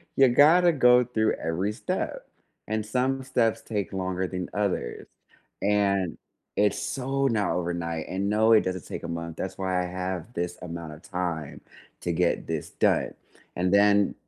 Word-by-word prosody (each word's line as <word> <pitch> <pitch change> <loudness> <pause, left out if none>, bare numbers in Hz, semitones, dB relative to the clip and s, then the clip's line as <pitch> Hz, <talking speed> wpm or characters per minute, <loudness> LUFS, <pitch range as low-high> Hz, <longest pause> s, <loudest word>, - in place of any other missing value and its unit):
you 135 -1 +6
gotta 160 +8 +6
go 125 -4 +5
through 110 -3 +1
every 90 +6 -1
step, 190 - -4 0.4
and 110 0 -1
some 130 +3 0
steps 115 -3 +1
take 105 -3 -3
longer 95 -1 -2
than 90 -1 -4
others, 100 -12 -2 0.6
and 100 -3 +2 0.4
it's 105 0 +2
so 135 +1 -1
not 110 -4 +1
overnight 85 -2 -3
and, 95 +2 -2
no, 110 +2 +3
it 110 -1 +7
doesn't 95 -4 -4
take - - -6
a - - -6
month, 85 -1 -5
that's 95 - -5
why 95 -1 0
I 90 - -4
have 90 +1 -4
this 90 -4 -3
amount 85 -3 -6
of 75 - -13
time 85 -6 -4 0.4
to 90 - -1
get 85 +1 +1
this 80 -2 -4
done, - - +1 0.4
and 90 +2 +1
then 100 0 +4
100 Hz, 165 wpm, -26 LUFS, 90-115 Hz, 0.6 s, it